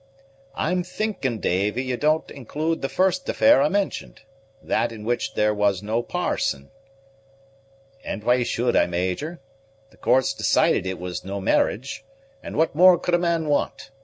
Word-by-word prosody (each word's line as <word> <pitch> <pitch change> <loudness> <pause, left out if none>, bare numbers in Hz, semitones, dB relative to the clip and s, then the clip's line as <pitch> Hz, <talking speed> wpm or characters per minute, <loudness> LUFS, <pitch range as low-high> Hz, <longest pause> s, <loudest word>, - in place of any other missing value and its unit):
"I'm 180 +3 0
thinking, 180 - -3
Davy, 105 +8 0
you 130 -1 -2
don't 155 +4 0
include 155 +5 -3
the 135 - -2
first 190 +9 0
affair 285 +2 +5
I - - +3
mentioned; 190 - -2 0.4
that 120 - -1
in 110 -2 -9
which 120 +1 -2
there 105 0 +2
was 105 -2 +1
no 110 +3 0
parson." 70 -10 -2 1.3
"And 105 - -5
why 125 +2 +3
should 120 0 0
I - - +4
Major? 95 - -3 0.5
The - - -22
courts 130 -1 +2
decided - - +2
that - - -2
it 95 - -5
was 90 0 -5
no 100 +1 -5
marriage; 115 +6 0 0.4
and - - -7
what 160 +1 +2
more 180 +3 +7
could 175 +1 -3
a 175 - +4
man 170 -2 0
want? 145 -2 -1
130 Hz, 160 wpm, -23 LUFS, 105-165 Hz, 1.3 s, more